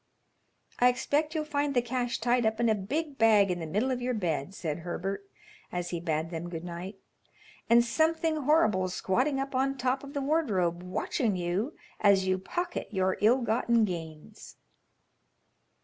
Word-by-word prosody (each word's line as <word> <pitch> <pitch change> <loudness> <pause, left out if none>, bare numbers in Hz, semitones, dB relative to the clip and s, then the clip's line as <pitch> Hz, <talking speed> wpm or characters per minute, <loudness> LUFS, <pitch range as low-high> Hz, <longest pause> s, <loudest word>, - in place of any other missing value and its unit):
"I 245 - +6
expect 290 +5 0
you'll 310 -1 -1
find 290 -2 -1
the 245 - +4
cash 245 0 -1
tied 240 +1 +2
up 220 0 0
in 235 -1 +3
a - - +4
big 275 +9 -3
bag 210 -4 +5
in 175 - -2
the 165 - -5
middle 215 +11 0
of 250 -1 -2
your 250 0 -1
bed," 175 -3 -2
said 155 -4 -3
Herbert, 190 +3 -4 0.5
as 175 0 -3
he 170 - -2
bade 160 -1 -2
them 170 +1 -5
good 165 -1 -6
night, 175 +3 -6 0.7
"and 235 +1 +6
something 320 +4 +1
horrible 220 - +2
squatting 255 +10 0
up 275 0 -3
on 270 +1 0
top 255 +2 0
of 280 0 -9
the 280 - 0
wardrobe 200 - +1
watching 190 +4 -1
you 180 - -2 0.2
as 200 -2 +4
you 185 0 +1
pocket 350 - -3
your 190 -3 0
ill 240 +5 +4
gotten 230 0 +2
gains." 165 +2 -8
220 Hz, 170 wpm, -29 LUFS, 180-265 Hz, 0.7 s, I